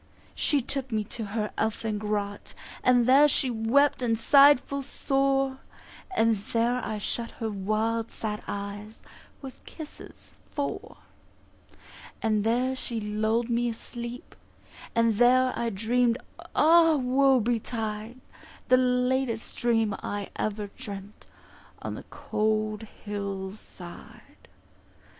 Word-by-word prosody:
She 285 -4 +1
took 270 0 -4
me 215 -1 0
to 225 - -4
her 210 +1 -3
elfin 220 -1 -1
grot, 205 -1 -3 0.3
And 245 -1 +5
there 275 +4 +7
she 265 -2 +1
wept 240 +6 +3
and 230 -2 +1
sighed 280 +3 +7
full 280 +1 -5
sore, 270 0 0 0.6
And 225 -1 +4
there 235 +4 0
I 215 - -3
shut 230 +3 -3
her 225 -1 -4
wild 215 +3 -1
sad 210 -1 -4
eyes 205 +2 -6 0.4
With 265 -1 -10
kisses 315 -2 -11 0.2
four. 285 -1 -4 1.2
And 215 -2 +1
there 250 +4 +1
she 235 -3 -3
lulled 220 +2 0
me 240 0 +1
asleep, 235 +2 -7 0.6
And 230 -2 +3
there 255 +2 +5
I 235 - -1
dream'd, 230 +3 +1 0.4
Ah 325 0 +6
Woe 265 0 +3
betide, 225 0 -3 0.5
The 255 - +7
latest 250 -2 0
dream 225 -3 +1
I 205 -1 -4
ever 210 -1 -3
dreamt 205 -4 -9 0.6
On - - -3
the - - -8
cold 215 0 -1 0.2
hill 200 -2 -4
side. 175 -4 -13
230 Hz, 120 wpm, -27 LUFS, 215-255 Hz, 1.2 s, there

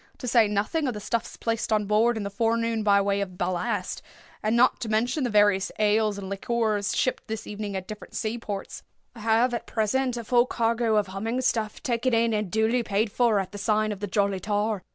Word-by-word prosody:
To 250 - -6
say 230 -2 +5
nothing 210 +10 0
of 250 - -2
the - - -4
stuffs 225 +2 -3
placed 230 0 -2
on 210 -1 +2
board 220 +3 +2
in 215 - -3
the 200 - -4
forenoon 230 +1 0
by 200 -1 +4
way 200 0 0
of 185 -2 -5
ballast, 180 -1 -2 0.4
and 215 +2 +1
not 245 +2 +4
to 225 - -4
mention 240 +7 +1
the 245 - 0
various 205 -2 +3
ales 215 0 +2
and 195 -1 -6
liqueurs 210 +1 -1
shipped 255 - 0
this 220 0 -5
evening 205 -1 -5
at 190 -1 -4
different 210 -1 -9
sea 225 +1 -2
ports, 205 -3 -6 0.3
I 230 - -13
have, 225 +3 +2
at 235 - -4
present, 245 +3 0
a 235 - -4
full 240 +2 +3
cargo 230 -1 +1
of 210 - +2
'humming 225 +6 -2
stuff' 220 -2 -1
taken 245 -2 +1
in 230 0 +2
and 210 -2 -1
duly 220 +4 +2
paid 210 0 0
for 235 -2 +2
at 190 -1 -4
the 205 - -7
sign 215 +1 +1
of 205 - -5
the 205 - -3
'Jolly 200 0 0
Tar. 210 +1 -1
215 Hz, 220 wpm, -26 LUFS, 205-235 Hz, 0.4 s, say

